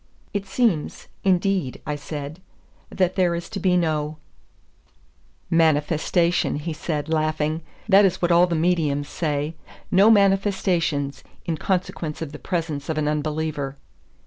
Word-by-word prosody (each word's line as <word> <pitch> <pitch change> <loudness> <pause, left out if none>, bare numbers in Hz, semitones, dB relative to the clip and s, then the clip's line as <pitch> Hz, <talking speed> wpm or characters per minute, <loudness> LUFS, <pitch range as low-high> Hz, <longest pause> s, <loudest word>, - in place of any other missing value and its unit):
"It 200 -1 -3
seems, 190 -6 0
indeed," 185 -6 +1
I 150 - -2
said, 145 +3 -7 0.5
"that 185 -1 0
there 180 -3 +2
is 170 0 -5
to 200 - -5
be 185 -2 +3
no 155 -3 -1 0.7
" - - -37
"Manifestation," 160 +3 +2
he 150 +3 -3
said, 155 -1 -3
laughing; 155 0 0 0.3
"that 200 -1 +7
is 190 -3 +2
what 175 0 +1
all 175 +1 +6
the 170 - -1
mediums 155 -4 +1
say. 150 -1 -2 0.4
No 195 +4 +6
manifestations, 190 -8 +2 0.2
in 165 -2 -1
consequence 175 -3 -2
of 160 -3 -5
the 150 - -9
presence 160 -6 -3
of 160 - -1
an 150 -1 0
unbeliever." 150 -2 -2
160 Hz, 140 wpm, -23 LUFS, 150-180 Hz, 0.7 s, that